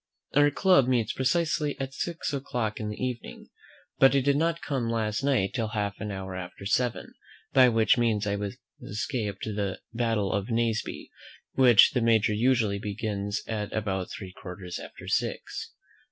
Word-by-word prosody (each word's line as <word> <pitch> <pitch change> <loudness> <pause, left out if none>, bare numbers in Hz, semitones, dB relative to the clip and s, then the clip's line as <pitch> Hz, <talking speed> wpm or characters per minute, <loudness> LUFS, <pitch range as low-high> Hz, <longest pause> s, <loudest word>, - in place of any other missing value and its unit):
Our 145 +1 +5
club 165 -3 +4
meets 120 -4 +1
precisely 150 +2 0
at 135 0 -4
six 165 -1 -3
o'clock 120 -5 -2
in 105 -1 -3
the 105 - -5
evening; 125 -2 -5 0.5
but 135 +1 +6
I 135 - +4
did 140 +1 +2
not 165 +2 0
come 130 -6 -1
last 110 -1 -1
night 130 -9 +2
till 115 -4 -1
half 105 -2 -2
an 105 - -3
hour 95 -1 -5
after 90 +2 -7
seven, 125 +4 0 0.4
by 130 -2 +7
which 115 +1 +3
means 110 -3 +1
I 100 0 0 0.5
escaped 105 -2 -3
the 100 -3 -2
battle 115 -4 0
of 100 +1 -1
Naseby, 115 -1 -1 0.4
which 125 -5 +7
the 125 - 0
Major 110 -2 +3
usually 110 -3 +2
begins 100 -1 -3
at 105 -2 -3
about 95 -4 -2
three 95 -2 -8
quarters 90 -1 -7
after - - -10
six. - - -2
115 Hz, 160 wpm, -27 LUFS, 105-130 Hz, 0.5 s, by